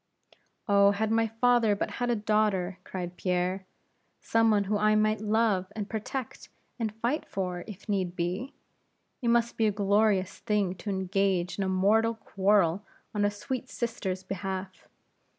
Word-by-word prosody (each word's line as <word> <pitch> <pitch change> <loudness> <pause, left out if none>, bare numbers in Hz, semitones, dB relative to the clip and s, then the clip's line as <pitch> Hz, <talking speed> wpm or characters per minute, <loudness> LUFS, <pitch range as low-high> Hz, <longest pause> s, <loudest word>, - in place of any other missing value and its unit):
"Oh, 200 -1 +6
had 215 +2 0
my 225 0 +3
father 225 -1 +3
but - - -3
had 245 - +1
a 240 - +2
daughter!" 205 -4 0
cried 180 -1 -6
Pierre; 185 +1 -1 0.5
"some 225 0 +2
one 210 -2 +3
whom 205 +1 -1
I 215 0 +4
might 215 0 +2
love, 215 -3 +1
and 210 -2 -3
protect, 225 +3 -5 0.3
and 225 -2 -1
fight 235 +8 -1
for, 180 -2 -3
if 205 -1 -10
need 190 -4 -1
be. 185 +10 -3 0.7
It 240 - -2
must 235 0 +2
be 225 - +3
a - - +2
glorious 200 -1 +1
thing 205 -4 0
to 210 - -6
engage 190 -1 0
in - - +1
a 190 - -1
mortal 215 +5 +3
quarrel 195 -3 +2 0.3
on 205 -1 0
a - - +3
sweet 255 +5 -5
sister's 195 -6 -3
behalf! 190 0 -5
205 Hz, 160 wpm, -28 LUFS, 190-220 Hz, 0.7 s, Oh